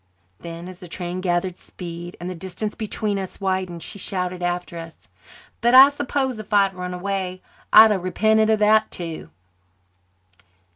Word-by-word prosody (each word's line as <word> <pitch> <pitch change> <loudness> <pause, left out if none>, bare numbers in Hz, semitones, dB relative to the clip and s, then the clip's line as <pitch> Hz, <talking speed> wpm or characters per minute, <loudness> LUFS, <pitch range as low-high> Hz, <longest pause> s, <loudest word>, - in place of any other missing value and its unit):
Then, 170 +1 -8
as 185 -1 -10
the 180 - -10
train 175 +1 -5
gathered 180 0 -1
speed 175 0 -9
and 175 - -6
the 185 - -4
distance 190 +5 -5
between 210 -2 -3
us 190 -1 -7
widened, 185 -3 -2
she 205 - -9
shouted 180 -1 -3
after 175 -1 -3
us, 165 -1 -12 0.5
"But 240 +2 +4
I 270 +2 +11
s'pose 275 -4 -2
if 215 - -10
I 205 -1 +6
had 195 -1 -2
run 180 0 -5
away 185 0 -3 0.3
I'd 220 -1 +9
have 195 -3 0
repented 220 +4 +2
of 220 - +4
that 215 +1 +4
too." 165 - -6
185 Hz, 165 wpm, -22 LUFS, 175-215 Hz, 0.5 s, I